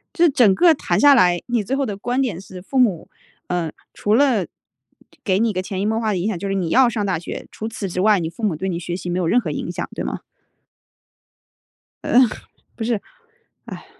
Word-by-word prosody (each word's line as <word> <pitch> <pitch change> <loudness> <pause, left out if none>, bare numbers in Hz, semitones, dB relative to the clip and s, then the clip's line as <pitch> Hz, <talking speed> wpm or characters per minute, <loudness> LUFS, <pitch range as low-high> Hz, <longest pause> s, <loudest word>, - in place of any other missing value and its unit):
这 345 -1 +5
整 240 -9 +4
个 340 - +6
谈 180 - -1
下 285 +3 +7
来， 180 -8 +4
你 240 -3 0
最 255 +7 -2
后 275 -1 0
的 205 - -4
观 245 +5 -1
点 220 -10 -2
是 185 -2 -11
父 265 +8 -5
母， 205 -10 +1 0.4
呃， 175 -3 -2 0.2
除 210 +1 +1
了 245 -7 +3 0.8
给 190 -2 +1
你 225 -1 +1
个 185 - -1
潜 190 0 -4
移 205 - -1
默 220 +1 0
化 220 - -1
的 190 - -1
影 180 +3 -1
响， 215 -5 -2
就 200 - -4
是 195 - -1
你 180 -4 -1
要 255 +7 +5
上 215 -3 -2
大 185 -4 -1
学， 170 - -7
除 220 - -6
此 225 -3 -5
之 180 +1 -2
外， 210 0 +4
你 160 -2 -3
父 175 +7 -12
母 200 -7 +1
对 190 +5 -3
你 170 -2 -2
学 175 0 -4
习 180 -1 -6
没 175 +1 -1
有 175 - 0
任 240 - +4
何 175 -10 -4
影 170 - -4
响， - - -4
对 - - -3
吗？ - - -4 1.8
呃， 250 - +4 0.5
不 230 - -5
是， 225 -3 -1 0.6
哎。 - - -9
200 Hz, 250 characters per minute, -21 LUFS, 180-240 Hz, 1.8 s, 下